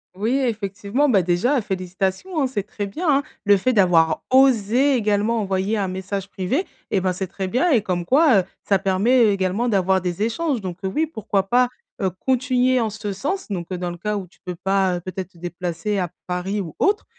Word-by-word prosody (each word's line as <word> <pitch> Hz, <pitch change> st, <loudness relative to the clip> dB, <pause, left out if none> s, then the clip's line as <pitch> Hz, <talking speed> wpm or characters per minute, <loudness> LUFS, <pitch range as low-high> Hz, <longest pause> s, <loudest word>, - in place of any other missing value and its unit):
Oui 225 Hz, +7 st, 0 dB
effectivement. 220 Hz, +2 st, -1 dB
Bah 205 Hz, -8 st, +4 dB
déjà 200 Hz, -, +1 dB
félicitations, 190 Hz, -, -2 dB
hein, 270 Hz, -, +2 dB
c'est 210 Hz, -6 st, -3 dB
très 205 Hz, 0 st, -5 dB
bien 310 Hz, -, -5 dB
hein. 280 Hz, 0 st, +3 dB, 0.2 s
Le 205 Hz, -, +6 dB
fait 200 Hz, +7 st, +1 dB
d'avoir 175 Hz, -7 st, +3 dB
osé 260 Hz, +1 st, +4 dB
également 215 Hz, 0 st, +1 dB
envoyer 195 Hz, +2 st, -1 dB
un 195 Hz, -2 st, 0 dB
message 190 Hz, +1 st, -4 dB
privé 225 Hz, -, -1 dB, 0.3 s
et 195 Hz, -, +2 dB
ben, 185 Hz, 0 st, 0 dB
c'est 190 Hz, +1 st, -4 dB
très 190 Hz, +1 st, -4 dB
bien 255 Hz, -, +1 dB
et 235 Hz, -, +4 dB
comme 180 Hz, -4 st, -2 dB
quoi, 270 Hz, -, +5 dB
heu, -, -, 0 dB, 0.2 s
ça 200 Hz, -, +4 dB
permet 205 Hz, +6 st, +3 dB
également 200 Hz, +4 st, 0 dB
d'avoir 190 Hz, -2 st, +2 dB
des 180 Hz, +2 st, -3 dB
échanges 265 Hz, +3 st, -1 dB
donc 185 Hz, -3 st, -6 dB
heu, 190 Hz, -, 0 dB
oui 315 Hz, -, +2 dB
pourquoi 205 Hz, -, -1 dB
pas, 245 Hz, +2 st, +3 dB, 0.3 s
heu, 190 Hz, -, +2 dB
continuer 255 Hz, +4 st, +1 dB
en 225 Hz, -, 0 dB
ce 205 Hz, -1 st, -5 dB
sens, 300 Hz, -, -3 dB
donc 175 Hz, -4 st, -4 dB
heu, 185 Hz, -, -2 dB
dans 175 Hz, 0 st, -3 dB
le 175 Hz, -, -8 dB
cas 210 Hz, +4 st, -2 dB
où 190 Hz, -2 st, -6 dB
tu 175 Hz, -, -27 dB
peux 180 Hz, -2 st, -5 dB
pas, 190 Hz, 0 st, +1 dB
heu, -, -, -7 dB
peut-être 185 Hz, 0 st, -6 dB
te 175 Hz, -, -22 dB
déplacer 175 Hz, +3 st, -3 dB
à 180 Hz, -3 st, -1 dB, 0.2 s
Paris 185 Hz, +3 st, -2 dB
ou 165 Hz, -6 st, -6 dB
autre 410 Hz, +2 st, +2 dB
200 Hz, 215 wpm, -22 LUFS, 185-245 Hz, 0.3 s, Le